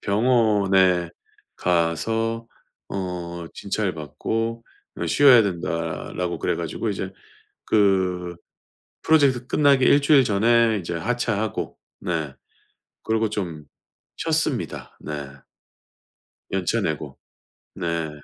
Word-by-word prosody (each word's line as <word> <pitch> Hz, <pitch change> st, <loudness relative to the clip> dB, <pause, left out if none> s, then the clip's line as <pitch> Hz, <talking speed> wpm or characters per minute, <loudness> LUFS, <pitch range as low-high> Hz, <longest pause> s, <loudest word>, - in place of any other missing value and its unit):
병원에 100 Hz, -6 st, +3 dB, 0.5 s
가서 115 Hz, +7 st, 0 dB, 0.4 s
어 85 Hz, -3 st, -5 dB
진찰받고 110 Hz, -, -3 dB, 0.4 s
어 85 Hz, -, -1 dB
쉬어야 125 Hz, -, +7 dB
된다라고 85 Hz, -1 st, -3 dB
그래 -, -, -1 dB
가지고 -, -, -3 dB
이제 -, -, -4 dB, 0.5 s
그 95 Hz, -4 st, +1 dB, 0.7 s
프로젝트 140 Hz, -6 st, +3 dB
끝나기 140 Hz, -3 st, +4 dB
일주일 140 Hz, -1 st, +5 dB
전에 115 Hz, +1 st, +3 dB
이제 85 Hz, -1 st, -4 dB
하차하고 110 Hz, +2 st, -2 dB, 0.2 s
네. 80 Hz, -5 st, -2 dB, 0.7 s
그러고 110 Hz, -1 st, 0 dB
좀 85 Hz, -8 st, -4 dB, 0.5 s
쉬었습니다. -, -, -2 dB
네. 75 Hz, -2 st, -5 dB, 1.2 s
연차 95 Hz, -2 st, 0 dB
내고. -, -, -3 dB, 0.6 s
네. 85 Hz, -2 st, -2 dB
100 Hz, 195 characters per minute, -23 LUFS, 85-115 Hz, 1.2 s, 쉬어야